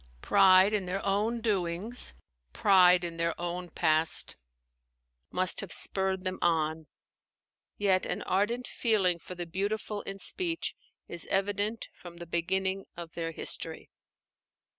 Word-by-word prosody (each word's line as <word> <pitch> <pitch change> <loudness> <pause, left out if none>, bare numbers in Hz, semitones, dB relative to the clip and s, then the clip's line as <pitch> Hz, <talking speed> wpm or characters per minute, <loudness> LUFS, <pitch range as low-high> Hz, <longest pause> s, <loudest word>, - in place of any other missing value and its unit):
Pride 190 0 +6
in 200 -3 0
their 190 +2 -3
own 215 +4 +1
doings, 205 +2 0 0.4
pride 180 -2 +5
in 170 -1 -4
their 165 0 -1
own 175 +1 -4
past, 160 -1 +1 0.9
must 185 0 +1
have 195 - -8
spurred 190 -1 0
them 185 0 -3
on; 160 -1 +1 0.9
yet 190 -2 +2
an - - -3
ardent 230 +6 0
feeling 190 -7 +1
for 180 - -9
the 175 0 -5
beautiful 205 +4 -3
in 195 - -7
speech 335 - -2 0.3
is 170 - -4
evident 205 +3 0
from 175 -1 -12
the 170 - -8
beginning 190 +3 -1
of 170 -1 -7
their 165 -1 -3
history. - - -3
185 Hz, 130 wpm, -29 LUFS, 170-200 Hz, 0.9 s, Pride